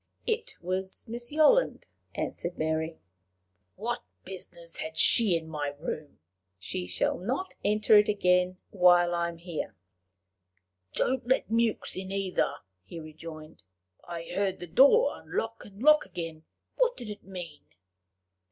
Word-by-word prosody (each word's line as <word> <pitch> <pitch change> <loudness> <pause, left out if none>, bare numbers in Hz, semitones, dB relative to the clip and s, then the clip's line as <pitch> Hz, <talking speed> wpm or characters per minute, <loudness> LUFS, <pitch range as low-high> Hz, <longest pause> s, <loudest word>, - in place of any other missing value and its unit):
"It 460 0 -2
was 190 +5 -1
Miss 240 +2 -6
Yolland," 315 +12 +4 0.3
answered 175 +1 -3
Mary. 160 +1 -1 0.8
"What 240 +4 -3 0.2
business 175 -3 -9
had 160 0 -5
she 205 -3 +5
in 160 -1 -8
my 145 -2 -3
room?" 155 -1 -5 0.4
"She 90 -1 -4
shall 90 - 0
not 260 - -2
enter 215 +1 +5
it 210 - +2
again 180 -2 +2
while 175 -2 +5
I 170 0 0
am 170 - -9
here." 170 -1 -5 1.2
"Don't 255 -2 0
let 260 -3 +1
Mewks 230 -1 +1
in 190 0 -5
either," 195 -2 0 0.3
he 165 - -9
rejoined. 155 -1 -10 0.4
"I 170 -1 -6
heard 190 0 0
the 175 - -7
door 280 - +5
unlock 225 0 -4
and 205 +3 -11
lock 300 -5 +6
again: 165 -3 -6 0.3
what - - +2
did 235 -4 -6
it 205 - -9
mean?" 175 -6 -8
185 Hz, 135 wpm, -29 LUFS, 165-225 Hz, 1.2 s, lock